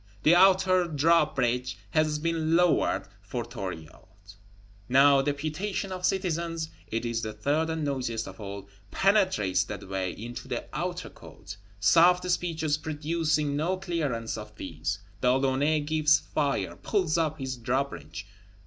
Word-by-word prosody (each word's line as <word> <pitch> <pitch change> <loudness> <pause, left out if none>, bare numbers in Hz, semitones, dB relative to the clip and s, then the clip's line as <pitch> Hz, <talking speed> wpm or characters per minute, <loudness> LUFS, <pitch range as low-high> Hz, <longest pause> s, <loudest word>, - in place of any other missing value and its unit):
The 155 - +6
Outer 185 0 +5
Drawbridge 140 -6 +1
has 155 -1 +2
been 165 0 0
lowered 175 -1 +2
for - - -5
Thuriot; 95 +2 -9 0.6
now 135 +2 +6
deputation 155 +8 -3
of 185 -1 -1
citizens 170 -3 -2 0.2
(it 115 +2 -3
is 115 -1 -1
the 110 -2 -4
third 145 +10 0
and 160 -1 -2
noisiest 125 -5 -2
of - - -10
all) 100 -1 -7 0.2
penetrates 185 - +2
that 100 -1 -7
way 95 -1 -2
into 120 +3 -8
the - - -3
Outer - - -3
Court; 100 +1 -11 0.2
soft 175 - +5
speeches 160 -4 0
producing 155 -1 -1
no 170 +6 0
clearance 145 -13 -2
of 105 0 -10
these, 85 0 -4 0.2
De 125 - +4
Launay 135 +4 +2
gives 155 +1 +3
fire; 145 -2 -2
pulls 180 -6 0
up 155 -1 0
his 130 -2 -4
drawbridge. 120 - -3
150 Hz, 135 wpm, -27 LUFS, 115-165 Hz, 0.6 s, The